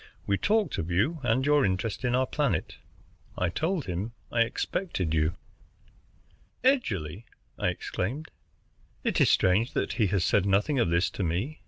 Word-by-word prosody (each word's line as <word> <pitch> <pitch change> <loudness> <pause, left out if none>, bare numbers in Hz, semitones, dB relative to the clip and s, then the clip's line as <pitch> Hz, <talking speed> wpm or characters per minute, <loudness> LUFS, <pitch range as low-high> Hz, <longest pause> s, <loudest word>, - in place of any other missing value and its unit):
We 100 - +2
talked 210 - +1
of 80 - -3
you 110 - +1
and 125 +1 +1
your 145 -1 +4
interest 95 +4 -1
in 125 -1 +1
our 130 +1 +2
planet. 130 - -1 0.6
I 90 - +1
told 160 - -1
him 95 +5 -4 0.2
I 120 - +2
expected 115 - -1
you." 80 +1 +1 1.3
"Edgerly!" 110 - 0 0.3
I - - +1
exclaimed. 135 +13 -3 0.7
"It - - +1
is - - +5
strange 100 +7 +3
that - - -1
he 110 -4 +2
has 95 -1 +1
said 100 +2 +2
nothing 105 +9 +2
of 100 - +2
this 85 +3 +2
to - - -5
me. 95 - -2
110 Hz, 160 wpm, -28 LUFS, 90-140 Hz, 1.3 s, is